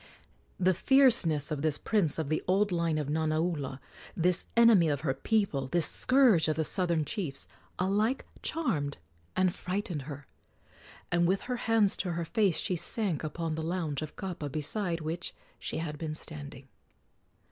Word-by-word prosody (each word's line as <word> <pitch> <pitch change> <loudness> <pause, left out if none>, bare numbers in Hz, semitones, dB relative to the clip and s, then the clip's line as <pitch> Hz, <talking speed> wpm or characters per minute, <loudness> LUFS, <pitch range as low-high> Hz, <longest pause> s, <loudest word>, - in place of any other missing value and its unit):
The 185 0 +4
fierceness 185 - +3
of 150 -2 -2
this 155 -2 +1
prince 195 -9 +1
of 160 -3 -2
the 155 - 0
old 200 +2 +2
line 170 -2 +1
of 150 -2 -2
Nanaula, 155 -2 -1 0.4
this 180 +1 +1
enemy 225 -8 +6
of 145 -1 -1
her 140 -4 0
people, 175 - 0
this 165 +3 +1
scourge 255 - +4
of 155 - +1
the 160 - 0
southern 170 -2 0
chiefs, 155 -7 -4 0.3
alike 210 +7 +1 0.2
charmed 155 - -1 0.4
and 185 -1 +2
frightened 185 -4 -3
her, 145 -1 -7 0.9
and 175 -1 +3
with 190 +2 +1
her 250 -1 -3
hands 225 -3 +4
to 180 -3 -2
her 170 0 -2
face 195 -1 +2
she 180 - 0
sank 180 -1 -1
upon 160 +1 -3
the 160 - -3
lounge 160 -3 -2
of 155 - -6
kapa 175 -6 -5
beside 165 +4 -1
which 160 +3 -4 0.2
she - - -4
had 150 -2 -4
been 155 -2 -3
standing. 145 -4 -8
170 Hz, 160 wpm, -30 LUFS, 155-195 Hz, 0.9 s, enemy